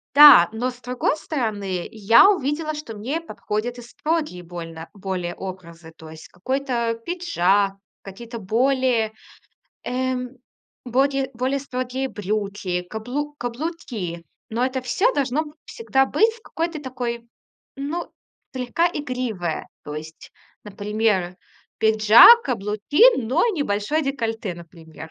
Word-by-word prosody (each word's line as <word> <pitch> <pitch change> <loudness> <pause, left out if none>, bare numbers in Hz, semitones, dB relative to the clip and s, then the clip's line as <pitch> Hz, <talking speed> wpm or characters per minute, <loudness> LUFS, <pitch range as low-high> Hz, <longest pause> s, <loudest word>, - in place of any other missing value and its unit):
Да, 290 -12 +10
но 245 +3 -1
с 250 -1 -11
другой 250 +5 -1
стороны, 205 - -3
я 225 - +6
увидела, 310 -3 -1
что 295 -8 -7
мне 260 +10 -3
подходят 240 -5 -4
и - - -8
строгие 300 - -3
больно 165 -1 -8
более 185 -3 -4
образы. 170 -3 -9
То 160 - -12
есть 160 0 -11
какой-то 245 +3 -2
пиджак, 205 - +1 0.3
какие-то 230 +5 -9
более, 235 +1 +1 0.7
эм, 255 0 -2 0.5
бокее 270 +2 +1
более 260 +3 -1
строгие 260 0 -3
брюки, 200 -3 -3
каблу 245 +10 -5
каблуки. 240 - -5 0.3
Но 230 +2 -1
это 260 0 -2
всё 385 - +1
должно 280 +3 0
б 295 - -12
всегда 270 - 0
быть 445 +11 +3
в 455 - -17
какой-то 330 -2 -4
такой, 240 -3 -4 0.5
ну, 295 +5 -4 0.4
слегка 255 +7 0
игривое. 250 - -3 0.2
То 150 - -7
есть, 155 +1 -9 0.3
например, 205 -3 -1 0.4
пиджак, 220 - +8
каблуки, 215 - -1
но 260 +7 0
и - - 0
небольшое 245 +5 0
декольте, 225 -7 -2
например. 165 -2 -12
240 Hz, 120 wpm, -22 LUFS, 200-275 Hz, 0.7 s, Да